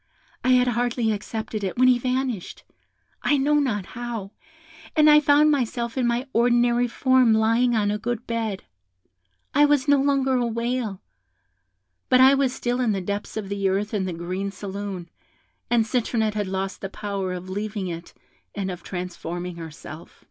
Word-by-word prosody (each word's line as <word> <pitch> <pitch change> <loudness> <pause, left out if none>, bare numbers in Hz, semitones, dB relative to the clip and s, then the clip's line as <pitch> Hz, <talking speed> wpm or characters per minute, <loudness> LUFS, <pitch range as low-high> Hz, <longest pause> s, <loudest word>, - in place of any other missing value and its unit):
I 255 - +4
had 250 0 +4
hardly 240 -1 0
accepted 215 0 -4
it, 190 +2 -3
when 255 +1 +5
he 250 -1 +5
vanished, 255 -5 -2 0.6
I 290 - +2
know 295 +2 +3
not 215 -9 -1
how, 235 -4 -6 0.6
and 305 -1 +5
I 300 0 +8
found 300 +1 +4
myself 240 -4 -1
in 255 -2 +1
my 240 +2 0
ordinary 240 +1 +3
form, 255 -1 +3
lying 230 +2 +3
on 205 -2 +1
a 210 - -2
good 240 +1 -3
bed; 225 -4 -3 0.9
I 290 +1 +6
was 290 -1 +2
no 285 -1 +5
longer 275 -1 +2
a 240 -1 +1
whale, 235 -3 -2 1.1
but 255 - +5
I 265 +1 +8
was 275 -2 +2
still 245 0 -2
in 230 -4 +2
the 195 - -1
depths 200 +4 -4
of 210 -2 -4
the 200 -1 0
earth 200 +3 -1
in 200 -3 0
the 185 - -3
green 180 +4 -3
saloon, 195 -2 -6 0.6
and 235 -2 +3
Citronette 225 -2 0
had 205 -2 -2
lost 190 +1 -3
the 195 - -4
power 200 -2 -4
of 180 0 -7
leaving 205 +1 -4
it 170 -1 -7 0.4
and 195 -2 -2
of 180 -1 -7
transforming 180 -1 -5
herself. 160 0 -10
225 Hz, 170 wpm, -24 LUFS, 195-250 Hz, 1.1 s, I